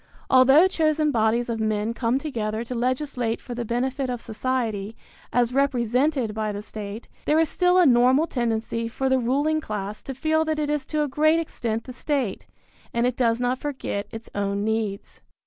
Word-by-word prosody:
Although 270 +7 +7
chosen 310 -4 +1
bodies 230 0 +1
of 230 -1 -2
men 215 0 0
come 235 +1 0
together 225 -6 -3
to 235 - -6
legislate 250 -1 -1
for 245 - -8
the 240 0 -3
benefit 255 +3 -1
of 245 -1 -2
society, 225 -3 -3 0.3
as 245 0 +2
represented 255 -1 +1
by 215 0 -2
the 205 0 -6
state, 210 +1 -7 0.2
there 305 - +3
is 320 -2 +3
still 360 0 +3
a 360 - +6
normal 255 +3 +5
tendency 230 -4 -2
for 265 +3 -2
the 260 0 +3
ruling 290 +6 +1
class 210 -4 -5
to 270 - -6
feel 315 +3 +1
that 315 -1 -1
it 295 -1 -1
is 295 -3 -2
to 305 -1 0
a - - -1
great 310 +4 +3
extent 230 -8 -3
the 255 - -9
state, 260 -5 -2 0.4
and 235 +1 +1
it 250 -1 0
does 230 -2 +1
not 250 +1 0
forget 260 -8 -4
its 225 0 -8
own 200 0 -1
needs. 220 -2 -3
245 Hz, 185 wpm, -24 LUFS, 225-285 Hz, 0.4 s, Although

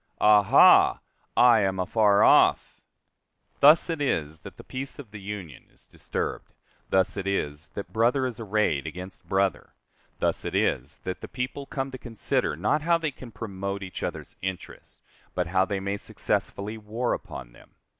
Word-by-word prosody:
aha! 105 -2 +6 0.4
I 120 -2 +7
am 95 -2 0
afar 100 +2 +3
off." - - +4 0.8
Thus 150 +3 +7
it 165 -3 -3
is 80 - -1
that - - -12
the - - -11
peace 135 +1 -6
of 125 -8 -11
the 105 -1 -9
Union 95 -8 -8
is - - -22
disturbed; - - -5 0.4
thus 95 -1 +2
it 100 0 -3
is 75 -6 -2
that 100 - -7
brother 120 +4 +2
is 120 -3 -4
arrayed 105 -9 0
against 90 +4 -9
brother; 95 0 0 0.4
thus - - -1
it - - -4
is 70 +5 0
that 95 - -5
the - - -7
people 135 +2 -5
come 135 -1 -4
to 130 - -8
consider 115 - -1
not 150 - 0
how 170 +2 +3
they 160 -3 -2
can 130 -2 -12
promote 100 -2 -5
each 95 - -7
other's - - -5
interests, 95 -1 -7 0.3
but 90 - 0
how 95 +2 +2
they 100 0 -3
may 100 +1 -3
successfully 105 +2 -2
war 110 +3 -2
upon - - -7
them. - - -20
100 Hz, 165 wpm, -26 LUFS, 95-120 Hz, 0.8 s, I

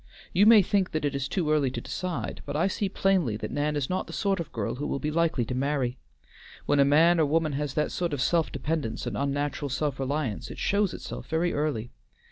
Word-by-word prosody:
You 200 +4 +5
may 220 -3 +8
think 190 0 0
that 155 -1 -1
it 145 - 0
is 140 -1 -2
too 160 -1 -1
early 150 -3 +3
to 130 - -4
decide, 185 -2 -4
but - - -4
I 155 - +2
see 195 +1 -1
plainly 185 - +1
that - - -5
Nan 150 +1 0
is 140 -3 -1
not 185 - -2
the - - -9
sort 195 -3 0
of 170 - -5
girl 110 -4 -2
who 145 +3 -4
will - - -1
be 150 +2 -2
likely 160 -6 +1
to 125 - -4
marry. 130 -1 -1 0.7
When 145 - +2
a - - +7
man 165 +5 +5
or 155 - +4
woman 155 +1 +1
has 145 -1 -3
that 150 - 0
sort 175 -2 -2
of 145 - -2
self 165 +4 +2
dependence 150 -8 -3
and - - -3
unnatural 145 +1 -1
self 140 +1 -2
reliance, 135 -5 -2
it - - -8
shows 200 -1 +1
itself - - -7
very 165 +2 0
early. 145 -6 -2
150 Hz, 235 wpm, -27 LUFS, 140-170 Hz, 0.7 s, may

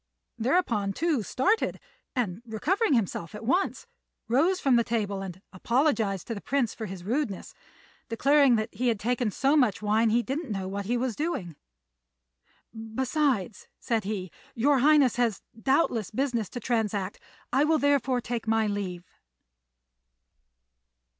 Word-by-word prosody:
Thereupon 230 - +1
Tou 315 - 0
started, 385 - 0 0.4
and, 220 -6 -2
recovering 295 - 0
himself 195 -5 -2
at 215 +1 -8
once, 370 - 0 0.4
rose 325 +11 +2
from 270 -6 +3
the 235 - +4
table 205 -4 -2
and 185 -2 -7
apologized 225 - +1
to 230 - -4
the 200 - -7
Prince 265 -5 0
for 220 - -6
his 185 -2 -8
rudeness, 225 -1 -2 0.6
declaring 275 +2 +4
that 220 0 -2
he 245 +5 -1
had 225 -4 +1
taken 245 +1 0
so 275 +8 +1
much 250 -9 +3
wine 215 +2 +2
he 235 +2 +2
didn't 275 +1 -4
know 195 -2 -3
what 200 +1 -4
he 245 +2 +1
was 245 -2 -1
doing. 290 - -3 1.2
"Besides," 230 - -1
said 225 -3 -1
he, 190 -3 -4 0.2
"your 275 +4 +3
Highness 285 -3 +4
has 235 -4 0 0.2
doubtless 265 - +1
business 235 -4 -1
to 245 - -6
transact; 210 -5 -1 0.3
I 270 +3 +4
will 315 +1 +3
therefore 275 -3 +2
take 235 -1 -4
my 225 0 +2
leave." 190 -4 -3
235 Hz, 145 wpm, -27 LUFS, 210-275 Hz, 1.2 s, the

